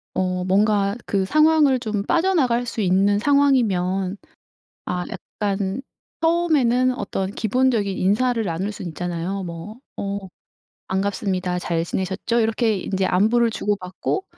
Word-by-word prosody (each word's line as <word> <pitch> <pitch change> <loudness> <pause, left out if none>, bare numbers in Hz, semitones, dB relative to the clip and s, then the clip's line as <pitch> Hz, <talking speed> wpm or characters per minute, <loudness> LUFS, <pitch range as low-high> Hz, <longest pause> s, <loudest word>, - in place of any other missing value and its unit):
어 185 -1 0
뭔가 200 +1 +2
그 195 -2 +1
상황을 305 +1 +4
좀 215 -4 -2
빠져나갈 275 - +2
수 230 - -3
있는 195 +2 +3
상황이면 205 -9 +2 0.7
아 180 0 -2
약간 200 +2 -3 0.4
처음에는 295 -7 +3
어떤 195 -1 -3
기본적인 220 -2 +1
인사를 230 +5 +1
나눌 185 +2 -2
순 190 -3 -6
있잖아요. 175 +3 -3
뭐 170 +6 -8 0.2
"어 200 0 -3 0.7
반갑습니다. 190 -2 -1
잘 170 -2 -1
지내셨죠?" 190 +7 -1
이렇게 225 -1 +1
인제 190 +1 -1
안부를 225 +6 +3
주고받고 205 - -2
205 Hz, 275 characters per minute, -22 LUFS, 190-240 Hz, 0.7 s, 상황을